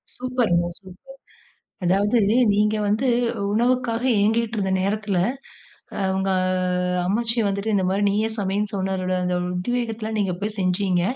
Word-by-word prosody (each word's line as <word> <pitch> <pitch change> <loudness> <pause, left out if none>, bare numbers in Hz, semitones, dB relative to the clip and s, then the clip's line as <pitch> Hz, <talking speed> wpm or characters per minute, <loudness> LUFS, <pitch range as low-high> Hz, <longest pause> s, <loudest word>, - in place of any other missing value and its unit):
சூப்பர்ங்க, 240 -9 0
சூப்பர். 195 +9 -15 0.7
அதாவது 200 +6 +2 0.4
நீங்க 210 +1 +2
வந்து 220 +6 +1 0.4
உணவுக்காக 240 0 +1 0.2
ஏங்கிட்டுருந்த 220 -2 +1
நேரத்துல, 200 -1 -1 0.8
ஆ - - -4 0.2
உங்க 190 0 0 0.8
அம்மாச்சி 230 +4 +1
வந்துட்டு 200 +2 -2
இந்த 190 -2 +2
மாரி 195 +2 0
நீயே 215 +2 +1
சமைனு 205 +1 -1
சொன்ன 190 0 -1
தோட 185 0 -2
அந்த 180 0 -1
ஒரு 180 - -2
உத்வேகத்துல, 225 +2 -2
நீங்க 195 -3 0
போய் 210 +1 -3
செஞ்சீங்க. 185 -1 +1
205 Hz, 130 wpm, -23 LUFS, 190-230 Hz, 0.8 s, அதாவது